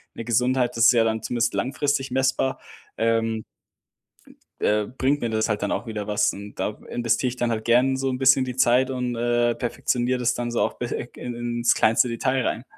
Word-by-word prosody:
'ne 115 - -6
Gesundheit, 125 +2 +1
das 115 - +4
ist - - +8
ja 115 -2 +3
dann 110 0 -1
zumindest 120 -1 0
langfristig 140 +1 -1
messbar, 130 0 0 0.4
ähm 115 -1 0 1.2
äh, 105 -1 +1
bringt 140 +2 +1
mir 120 - -1
das 110 0 0
halt 105 -1 -1
dann 105 - -1
auch - - -3
wieder 105 -2 -5
was 105 0 +2
und 100 +1 -10
da 105 - -3
investiere 120 +2 0
ich 125 - -7
dann 120 -1 0
halt 110 -1 -3
gern 125 +3 +3
so 135 0 -1
'n 130 - -2
bisschen 135 0 +4
die 125 -1 -5
Zeit 125 +1 +3
und, 125 -2 -2
äh, 120 0 +1
perfektioniere 125 +1 -1
das 120 0 +1
dann 120 -1 -3
so 120 - 0
auf - - -1
be 120 - -3
eg 120 - -8
in 125 - -5
ins 120 0 +1
kleinste 115 +3 +3
Detail 130 +2 -1
rein. 115 - -3
120 Hz, 210 wpm, -24 LUFS, 115-130 Hz, 1.2 s, ist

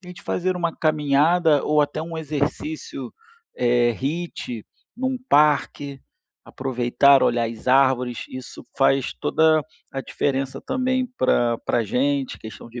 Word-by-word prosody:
tente 180 -1 -12
fazer 185 +1 -1
uma 170 -2 -1
caminhada 155 +1 +3
ou 150 0 +3
até 145 +1 -1
um 165 0 -6
exercício, 160 - -4 0.4
eh, 120 -1 +3
HIIT 135 -4 -4 0.3
num 260 +1 -1
parque. 145 -2 +2 0.4
Aproveitar, 130 +1 +3
olhar 120 -1 +2
as 115 +2 -7
árvores, 130 -2 +2
isso 130 0 -9
faz 135 -1 +2
toda 160 -1 +2 0.3
a 135 - -3
diferença 135 0 -2
também 255 0 -1
pra 120 -2 +2
pra 120 -2 0
gente. 135 +4 -1
Questão 110 +1 -10
de 120 +1 -8
140 Hz, 125 wpm, -23 LUFS, 125-160 Hz, 0.4 s, caminhada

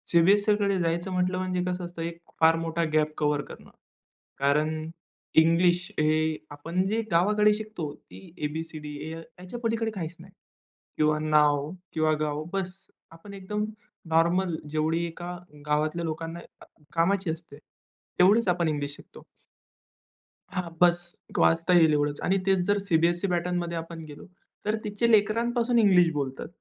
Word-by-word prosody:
सीबीएससीकडे 200 +3 +3
जायचं 170 +2 -1
म्हंटलं 185 0 0
म्हणजे 185 -1 -1
कसं 180 0 -2
असतं 175 -1 -8
एक 170 0 -4 0.2
फार 160 0 +6
मोठा 165 0 -1
गॅप 155 0 +2
कव्हर 150 -1 +1
करणं. - - -12 0.7
कारण 155 +3 +1 0.5
इंग्लिश 175 +2 +4
हे 155 +1 +2
आपण 165 +6 -2
जे 220 +3 0
गावाकडे 210 +5 +4
शिकतो 210 -8 -5
ती 180 -4 -15
ए, 150 - -1
बी, 160 +2 -4
सी, 160 -1 -9
डी, 150 -1 -7
या 165 - -6 0.2
याच्या 185 +7 -7
पलीकडे 230 -1 -1
काहीच 175 -5 -5
नाही. 185 +2 -14 0.6
किंवा 155 0 +2
नाव 150 -1 +3 0.2
किंवा 155 -1 +2
गाव 150 0 -2
बस. 195 0 -4 0.3
आपण 165 +5 -12
एकदम 210 +2 -3 0.4
नॉर्मल 170 +2 +2
जेवढी 160 +2 0
एका 175 +1 -6 0.3
गावातल्या 155 +3 0
लोकांना 165 +1 -4 0.2
अ, - - -12 0.3
कामाची 185 +2 +1
असते, 160 -3 -6 0.6
तेवढीच 205 +5 +5
आपण 175 -2 +2
इंग्लिश 145 -2 -2
शिकतो. - - -15 1.2
हां, 185 -2 -3
बस. 175 0 +3 0.2
वाचता 165 +2 +3
येईल 165 -3 +6
एवढंच. 145 0 0
आणि 195 - +2
तेच 195 -1 +3
जर 205 0 +3
सीबीएससी 175 -1 +1
पॅटर्नमध्ये 175 -1 -1
आपण 165 0 -7
गेलो 145 -1 -11 0.4
तर 210 +1 +1
तिथे 210 +3 0
लेकरांपासून 230 +3 +2
इंग्लिश 185 -5 +5
बोलतात. 135 -3 -3
170 Hz, 145 wpm, -27 LUFS, 155-190 Hz, 1.2 s, फार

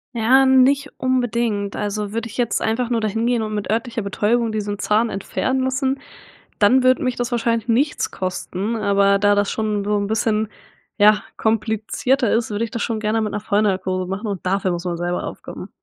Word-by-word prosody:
Ja 255 +4 +4
nicht 265 +2 +4
unbedingt 235 -5 0
also 210 0 -3
würde 230 0 -3
ich 230 - -11
jetzt 240 -2 0
einfach 240 +2 -1
nur 230 - +1
dahin 220 +2 -1
gehen 240 -1 +1
und 215 -1 -3
mit 210 0 -3
örtlicher 230 0 -1
Betäubung 220 +3 0
diesen 205 -1 -3
Zahn 215 +3 +1
entfernen 260 +7 -2
lassen, 265 +1 0 0.6
dann 250 +5 +5
würde 255 0 +3
mich 255 -1 -1
das 245 0 -3
wahrscheinlich 230 -1 0
nichts 260 +6 +1
kosten, 185 +3 -3
aber 200 -2 +3
da 205 0 +4
das 205 0 +1
schon 210 -2 -1
so 210 0 +1
'n 200 0 -1
bisschen, 220 0 0 0.5
ja, 210 0 +5 0.2
komplizierter 220 +3 0
ist, 225 0 +1
würde 210 +2 -1
ich - - -14
das 230 - -3
schon 225 -2 -2
gerne 220 +1 0
mit 210 - -2
'ner 210 - -2
Vollnarkose 190 -3 0
machen 195 +4 -4
und 200 -4 -4
dafür 190 0 0
muss 175 0 -3
man 175 -1 -3
selber 175 0 -2
aufkommen. - - -8
220 Hz, 195 wpm, -21 LUFS, 205-240 Hz, 0.6 s, dann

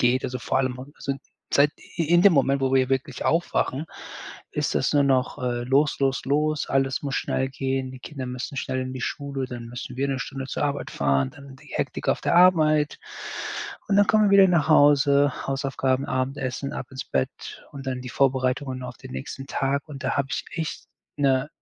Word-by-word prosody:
geht, 125 +2 +3
also 125 0 -3
vor 125 - 0
allem 130 -1 -1
also 135 - -10 0.2
sind 135 - -8 0.3
seit 145 +1 +5
i - - -5
in 175 +1 +5
dem 200 -2 +7
Moment, 140 -1 +3
wo 135 0 +1
wir 130 -1 +3
wirklich 135 0 -2
aufwachen, 160 -3 0 0.6
ist - - -1
das - - +1
nur 145 -1 +4
noch, 135 0 +1
äh, 120 -1 -1
los, 140 +4 +2
los, 135 -1 +1
los, 150 +2 +1
alles 135 -1 +1
muss 140 -2 -2
schnell 130 +1 0
gehen, 135 -1 -2
die 130 - -10
Kinder 130 -2 -6
müssen 125 +2 -5
schnell 130 0 -2
in 130 0 -4
die 130 - -6
Schule, 140 0 -3
dann 120 -2 -7
müssen 125 +1 -7
wir 140 +2 0
‘ne 135 -1 -1
Stunde 135 +1 -5
zur 140 - -2
Arbeit 140 -1 -2
fahren, 70 -1 +1
dann 140 -1 -13
die - - -18
Hektik - - -3
auf - - +2
der - - +1
Arbeit. 155 -4 +5 0.9
Und, 200 - +2
dann 205 0 +6
kommen 215 0 +5
wir 205 - +3
wieder 190 -1 +8
nach 170 -4 +2
Hause, 145 -2 +5
Hausaufgaben, 135 -1 0
Abendessen, 130 +1 -2
ab 130 - -5
ins 130 0 -6
Bett 65 - -3
und 140 -1 -8
dann 130 -1 -2
die 125 - -7
Vorbereitungen 130 0 0
auf 125 -1 -7
den - - -11
nächsten 65 - -6
Tag 140 +3 -1
und 140 -1 -8
da 130 - 0
habe 140 - +1
ich - - -2
echt 160 -2 -4 0.3
‘ne 135 -1 +2
135 Hz, 205 wpm, -25 LUFS, 130-145 Hz, 0.9 s, wieder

